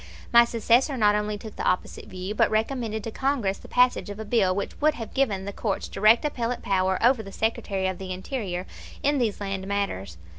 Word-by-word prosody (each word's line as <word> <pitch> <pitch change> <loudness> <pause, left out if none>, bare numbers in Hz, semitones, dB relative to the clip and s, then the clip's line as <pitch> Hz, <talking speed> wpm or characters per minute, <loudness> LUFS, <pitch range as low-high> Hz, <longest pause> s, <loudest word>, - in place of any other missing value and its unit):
My 235 0 +8
successor 235 +4 +2
not 210 -3 +4
only 210 0 -1
took 215 +1 -10
the - - -3
opposite 180 - -1
view, 185 +2 -5
but - - +3
recommended 220 -1 -1
to 225 - -5
Congress 250 -7 -1
the - - -13
passage 250 -3 +2
of 205 - -6
a 220 - -5
bill 205 -5 +2
which 200 - -4
would 305 0 +3
have 225 -2 -7
given 205 -8 0
the 200 - -5
courts 200 -2 -2
direct 215 +7 +4
appellate 245 -4 -2
power 190 -1 +1
over 250 -1 +4
the 195 -2 -10
Secretary 195 -3 -1
of 185 -1 -3
the 190 -1 -6
Interior 185 -2 -4 0.4
in 285 0 +2
these 225 -5 0
land 195 -1 -4
matters. 195 - -3
210 Hz, 210 wpm, -25 LUFS, 195-235 Hz, 0.4 s, My